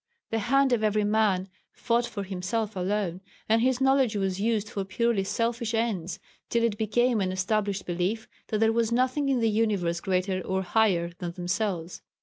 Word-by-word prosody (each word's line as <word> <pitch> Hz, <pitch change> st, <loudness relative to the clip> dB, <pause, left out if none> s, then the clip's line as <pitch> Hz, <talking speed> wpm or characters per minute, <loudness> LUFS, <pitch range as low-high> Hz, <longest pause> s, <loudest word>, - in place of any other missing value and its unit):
The 225 Hz, -, +1 dB
hand 265 Hz, +4 st, +3 dB
of 225 Hz, -2 st, +1 dB
every 215 Hz, 0 st, +2 dB
man 205 Hz, -3 st, +2 dB, 0.3 s
fought 235 Hz, 0 st, 0 dB
for 200 Hz, -, -5 dB
himself 200 Hz, +3 st, -3 dB
alone, 185 Hz, -1 st, -1 dB, 0.3 s
and 225 Hz, +1 st, +3 dB
his 255 Hz, +1 st, +2 dB
knowledge 265 Hz, -4 st, +3 dB
was 195 Hz, -1 st, -1 dB
used 220 Hz, -1 st, +1 dB
for 205 Hz, -4 st, -3 dB
purely 205 Hz, +1 st, 0 dB
selfish 230 Hz, +2 st, -1 dB
ends, 195 Hz, -6 st, -1 dB, 0.3 s
till 235 Hz, 0 st, +1 dB
it 230 Hz, -3 st, +1 dB
became 225 Hz, +2 st, +1 dB
an 185 Hz, -1 st, 0 dB
established 200 Hz, +1 st, -1 dB
belief 180 Hz, +6 st, -2 dB, 0.2 s
that 215 Hz, -, -1 dB
there 225 Hz, +1 st, +3 dB
was 230 Hz, 0 st, +1 dB
nothing 255 Hz, +4 st, +1 dB
in 260 Hz, -3 st, +2 dB
the 225 Hz, -, +3 dB
universe 200 Hz, -6 st, +1 dB
greater 185 Hz, +1 st, -1 dB
or 190 Hz, +1 st, -1 dB
higher 180 Hz, -4 st, +2 dB
than 175 Hz, -2 st, -4 dB
themselves. 180 Hz, -1 st, -2 dB
210 Hz, 175 wpm, -27 LUFS, 190-230 Hz, 0.3 s, hand